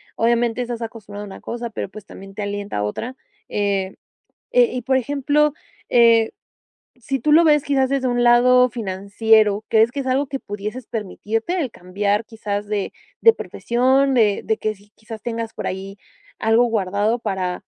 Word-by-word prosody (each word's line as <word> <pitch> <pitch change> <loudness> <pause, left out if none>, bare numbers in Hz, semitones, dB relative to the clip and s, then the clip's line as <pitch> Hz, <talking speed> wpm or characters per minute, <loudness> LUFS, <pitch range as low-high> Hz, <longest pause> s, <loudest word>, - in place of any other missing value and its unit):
obviamente 235 +1 +1
estás 240 -1 -4
acostumbrado 210 -3 -7
a - - -10
una 195 - -10
cosa 235 0 -5
pero, 220 - -5
pues, 215 +1 -11
también 195 0 -12
te 210 - -5
alienta 205 - -4
a 105 - 0
otra, 230 - -4 0.3
eh 200 -2 -1 0.6
eh, - - +6
y 250 - -3
por 265 +3 0
ejemplo, 290 +3 +1 0.4
eh, 230 -2 +5 0.7
si 270 +3 -3
tú 300 - +1
lo 330 +2 +6
ves 295 -2 +4
quizás 270 -2 +1
desde 270 -1 0
un 245 0 +1
lado 250 +1 +6
financiero, 210 0 +1
crees 220 +1 +4
que 280 - -3
es 265 - -8
algo 270 +2 +1
que 270 0 -4
pudieses 210 +5 -6
permitirte 225 - -3
el 270 -8 -2
cambiar 200 +4 -1
quizás 210 -2 -4
de 205 -2 -2 0.3
de 455 - +8
profesión 265 - +1
de 215 -5 +3
de 220 0 0
que 215 0 -2
sí 205 +1 -23
quizás 220 0 -10
tengas 230 0 -4
por - - -6
ahí 195 +1 -6 0.4
algo 225 +2 +3
guardado 210 +1 0
para, 190 -5 -3
225 Hz, 175 wpm, -21 LUFS, 205-250 Hz, 0.7 s, de